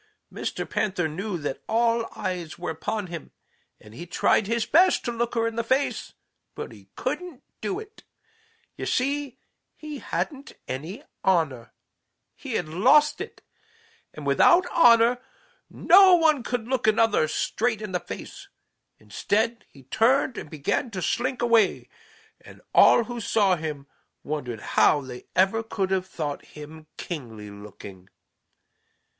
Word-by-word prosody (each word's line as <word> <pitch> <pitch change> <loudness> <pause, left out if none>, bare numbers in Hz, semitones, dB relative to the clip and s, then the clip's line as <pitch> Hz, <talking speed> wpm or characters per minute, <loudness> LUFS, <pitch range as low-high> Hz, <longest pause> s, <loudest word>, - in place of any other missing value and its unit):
Mr. - - -4
Panther 185 -5 -1
knew 180 +5 -4
that 145 -4 -5
all 230 0 +1
eyes 180 -4 -4
were - - -4
upon 205 +6 -3
him, 170 -3 -8 0.5
and 105 - -16
he 170 +9 -9
tried 195 +3 +2
his 230 0 0
best 355 +8 +4
to 240 - -1
look 235 +1 -2
her 230 0 +1
in 230 0 -3
the 230 - 0
face, 260 +4 -1 0.4
but - - -6
he - - -16
couldn't 350 -7 -4 0.2
do 385 0 -2
it. 435 0 -12 0.7
You - - -5
see, 275 0 -1 0.4
he 300 -2 -8
hadn't 280 -1 -4
any 165 - -6 0.2
honor. 150 -11 +1 0.6
He 270 -4 -8
had 175 -7 -1
lost 255 - +4
it, - - -9 0.7
and - - -10
without 355 +1 +5
honor 240 -4 +5 0.5
no 375 0 +6
one 315 -5 +3
can 240 -1 -3
look 255 -1 -1
another 220 -6 +3
straight 225 +7 -1
in 210 -2 -6
the 180 - 0
face. - - -9 0.5
Instead 220 - -1
he 135 - -17
turned 245 - +2
and - - -7
began 155 - -2
to 190 -4 -5
slink 255 +1 -1
away, 230 -2 +2 0.5
and - - -14
all 240 - +6
who 240 0 -6
saw 200 -3 +2
him 155 -4 -5 0.4
wondered 130 -7 -4
how 145 - +3
they 125 -2 -10
ever 195 +5 +3
could 195 -4 -3
have 185 -1 0
thought 145 -5 -5
him 155 +1 -12
kingly 115 - -7
looking. 100 -2 -12
215 Hz, 145 wpm, -25 LUFS, 155-245 Hz, 0.7 s, no